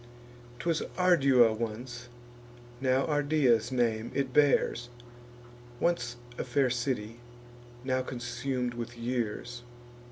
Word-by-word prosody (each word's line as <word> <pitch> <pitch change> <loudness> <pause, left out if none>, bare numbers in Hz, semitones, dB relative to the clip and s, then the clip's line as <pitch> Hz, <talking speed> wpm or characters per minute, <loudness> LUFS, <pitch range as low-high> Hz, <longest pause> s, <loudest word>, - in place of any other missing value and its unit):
'Twas 165 +4 0 0.2
Ardua 140 -11 +5
once; 120 +2 -5 0.7
now 130 0 +2
Ardea's 145 -6 +2
name 115 -3 0
it 135 -2 -1
bears; 130 -4 +3 0.9
Once 170 -8 0 0.2
a - - 0
fair 130 0 +1
city, 120 -3 -2 0.6
now 130 0 0
consum'd 125 0 -3
with 120 0 -6
years. 120 0 -3
125 Hz, 95 wpm, -30 LUFS, 120-135 Hz, 0.9 s, Ardua